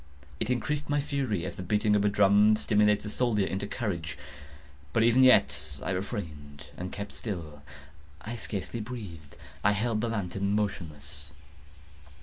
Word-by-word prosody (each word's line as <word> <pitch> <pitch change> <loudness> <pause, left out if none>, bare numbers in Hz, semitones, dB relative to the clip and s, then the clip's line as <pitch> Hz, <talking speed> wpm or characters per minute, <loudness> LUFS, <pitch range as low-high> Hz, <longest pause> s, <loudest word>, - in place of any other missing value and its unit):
It 110 - -1
increased 145 +5 -1
my 145 0 +2
fury, 135 - -1
as - - -6
the - - -4
beating 105 +3 +2
of 100 - +3
a 105 - +4
drum 105 +1 +5
stimulates 105 -1 +3
the 105 - -4
soldier 110 -4 +1
into 95 +2 -3
courage. 85 - -3 0.8
But 115 - +4
even 120 +3 +5
yet 100 - +4
I 70 - -2
refrained 75 -7 -5
and 90 +1 -5
kept 100 0 -5
still. 80 -9 -6 0.6
I 115 +2 -6
scarcely 110 0 -4
breathed. 100 -10 -8 0.3
I 105 - +5
held 110 +1 0
the 120 - -1
lantern 100 -2 -1
motionless. 90 -8 -3
105 Hz, 150 wpm, -29 LUFS, 90-115 Hz, 0.8 s, drum